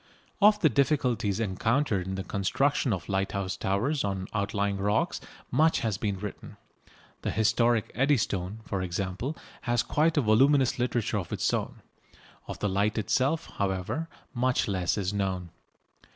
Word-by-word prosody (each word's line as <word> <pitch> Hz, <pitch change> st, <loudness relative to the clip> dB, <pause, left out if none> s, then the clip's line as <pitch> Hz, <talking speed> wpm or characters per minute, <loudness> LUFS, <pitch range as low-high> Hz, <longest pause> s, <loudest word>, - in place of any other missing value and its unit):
Of 210 Hz, +1 st, +6 dB
the 160 Hz, -, +6 dB
difficulties 125 Hz, -8 st, +1 dB
encountered 110 Hz, 0 st, 0 dB
in 95 Hz, -, -3 dB
the 95 Hz, -, -3 dB
construction 125 Hz, +8 st, +1 dB
of 95 Hz, -4 st, -3 dB
lighthouse 95 Hz, -1 st, -1 dB
towers 120 Hz, +10 st, 0 dB
on 95 Hz, -2 st, -2 dB
outlying 100 Hz, -1 st, 0 dB
rocks 105 Hz, +3 st, 0 dB, 0.3 s
much 160 Hz, +1 st, +3 dB
has 110 Hz, -6 st, -1 dB
been 100 Hz, -3 st, -1 dB
written. 105 Hz, +1 st, -8 dB, 0.6 s
The -, -, -2 dB
historic 110 Hz, +1 st, +2 dB
Eddystone, 110 Hz, -7 st, 0 dB
for 100 Hz, -2 st, -2 dB
example, 95 Hz, -, -3 dB, 0.3 s
has 120 Hz, 0 st, +3 dB
quite 155 Hz, +4 st, +1 dB
a -, -, +5 dB
voluminous 130 Hz, +4 st, +4 dB
literature 120 Hz, -3 st, 0 dB
of 90 Hz, -, -7 dB
its -, -, 0 dB
own. -, -, -3 dB, 0.6 s
Of -, -, -5 dB
the 105 Hz, -, -1 dB
light 100 Hz, +3 st, +1 dB
itself, 130 Hz, -, +1 dB
however, 100 Hz, -, -1 dB, 0.3 s
much 125 Hz, +1 st, +1 dB
less 95 Hz, -2 st, 0 dB
is 100 Hz, -1 st, -1 dB
known. 95 Hz, -4 st, -2 dB
105 Hz, 145 wpm, -28 LUFS, 95-130 Hz, 0.6 s, Of